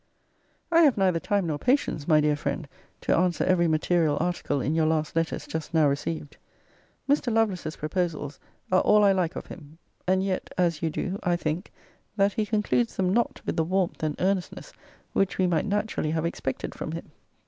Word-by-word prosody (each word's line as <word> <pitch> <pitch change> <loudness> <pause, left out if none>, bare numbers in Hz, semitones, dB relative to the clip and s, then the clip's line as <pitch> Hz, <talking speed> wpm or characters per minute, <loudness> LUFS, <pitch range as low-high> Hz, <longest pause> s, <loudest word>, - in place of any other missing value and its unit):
I 335 0 +6
have 290 -8 +5
neither 185 -4 +2
time 200 +1 0
nor 155 -3 -2
patience, 250 - 0
my 155 -3 +5
dear 150 0 +2
friend, 145 +1 -3 0.3
to - - +2
answer 175 0 +1
every 175 -2 +3
material 160 -1 +2
article 175 -4 -1
in 145 +4 -1
your 160 -1 +2
last 155 -1 0
letters 165 0 -1
just 160 0 -5
now 155 -2 +5
received. 145 +1 -3 0.7
Mr. 280 -3 +2
Lovelace's 205 -8 0
proposals 155 -2 -3 0.3
are 185 - +5
all 210 0 +5
I 200 - +6
like 185 -2 0
of - - -5
him. 155 -2 -12 0.3
And 190 +1 +3
yet 190 -1 -2
(as 170 -3 +1
you 165 - +1
do) 185 +5 -3
I 175 -1 +1
think, 165 +2 -3 0.5
that 200 0 +3
he 215 -1 -1
concludes 220 +2 +1
them 185 -1 +1
not 235 +2 0
with - - -2
the 160 - +3
warmth 185 +1 -1
and 155 -1 -1
earnestness 195 - -2 0.4
which 195 -1 +1
we 185 - +3
might 170 -1 +1
naturally 205 -6 -1
have 160 +1 -1
expected 170 - -3
from - - -5
him. - - -7
175 Hz, 190 wpm, -26 LUFS, 155-195 Hz, 0.7 s, I